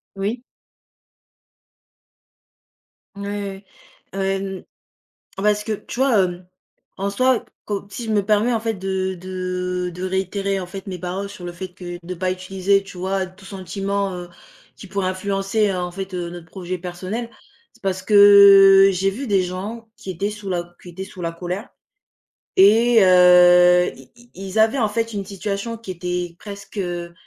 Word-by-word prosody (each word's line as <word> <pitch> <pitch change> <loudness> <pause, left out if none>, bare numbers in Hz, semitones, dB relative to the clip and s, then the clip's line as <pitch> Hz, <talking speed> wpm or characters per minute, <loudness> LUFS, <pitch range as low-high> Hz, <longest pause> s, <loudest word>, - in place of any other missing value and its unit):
Oui. 210 +6 -3 2.7
Mouais, 200 -1 -5 0.5
ouais. 195 - -6
Heu, - - 0
n 195 -1 -3 0.7
parce 210 +1 +1
que 220 - -4
tu 225 +4 -5
vois? 260 -6 +4
Hem, 180 0 -4 0.5
en 200 +1 -1
soi, 255 +3 +1 0.2
co 200 -1 -4
si 220 +4 -7
je 220 - -2
me 205 -2 +1
permets, 215 +4 +2
en 225 - +1
fait, 225 0 -2
de 190 -1 -2
de 180 0 -3
de 180 - -7
réitérer, 195 +1 -1
en 180 - -5
fait, 195 +1 -8
mes 185 -2 -5
paroles 190 +3 -4
sur 185 -3 -10
le 175 - -6
fait 185 +2 -7
que 175 -1 -8
de 185 - -4
pas 185 +1 -1
utiliser, 190 +1 0
tu 195 -2 -12
vois, 190 +1 -1
tout 185 +1 -16
sentiment, 195 +1 -3
heu, 175 0 -8 0.5
qui 200 - -12
pourrait 195 -1 -2
influencer, 195 +2 0
en 180 -1 -3
fait, 190 +1 -7
heu, 175 -1 -3
notre 175 -1 -10
projet 185 +1 -5
personnel, 185 +7 -5 0.4
c'est 235 - -26
parce 190 -1 -2
que 200 -1 +8
j'ai 190 +1 +1
vu 255 +8 -5
des 195 -3 +3
gens 205 +6 -6
qui 190 - -7
étaient 195 +4 -2
sous 210 -2 -7
la 175 -1 -4
qui 180 - -10
étaient 190 +2 -7
sous 190 -2 -11
la 170 0 -2
colère, 180 +6 -5 0.9
et 225 +3 +6
heu, 180 -1 +6
i - - -16
i 240 0 -20
ils 195 +2 -6
avaient, 220 +5 +4
en 220 - +2
fait, 230 +2 -2
une 200 -2 -4
situation 200 +4 -4
qui 220 -4 -8
était 180 -1 -4
presque, 200 0 -10
heu, 175 -2 -4
195 Hz, 170 wpm, -21 LUFS, 180-205 Hz, 2.7 s, que